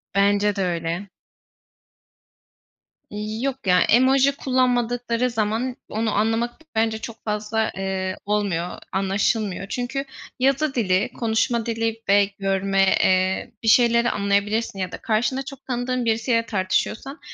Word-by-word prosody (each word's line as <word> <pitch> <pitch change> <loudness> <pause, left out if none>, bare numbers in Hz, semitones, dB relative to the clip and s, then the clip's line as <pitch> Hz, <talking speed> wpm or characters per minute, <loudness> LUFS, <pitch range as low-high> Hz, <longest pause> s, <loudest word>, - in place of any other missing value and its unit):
Bence 205 +1 +3
de 195 - -2
öyle. 170 +2 -3 2.3
Yok 270 -5 -3
ya, 180 0 +5
emoji 265 +3 +4
kullanmadıkları 245 -2 0
zaman 225 +2 -1
onu 220 0 -1
anlamak 225 +3 +1 0.2
bence 220 0 +1
çok 220 +1 -9
fazla, 215 +1 -1
eee, 190 -1 -2
olmuyor, 200 -4 0 0.2
anlaşılmıyor. 195 +1 0
Çünkü 260 +4 -3 0.3
yazı 275 +2 +1
dili, 205 0 +1
konuşma 230 0 0
dili 225 -1 -2
ve 200 0 +6
görme, 195 0 +2 0.2
eee, 185 +5 +1
bir - - -3
şeyleri 235 0 +5
anlayabilirsin 200 +1 0
ya 185 -1 -3
da - - -6
karşında 240 +4 0
çok 275 0 -10
tanıdığın 250 -1 -2
birisiyle 230 +1 +1
tartışıyorsan 220 - -1
220 Hz, 120 wpm, -23 LUFS, 200-245 Hz, 2.3 s, ve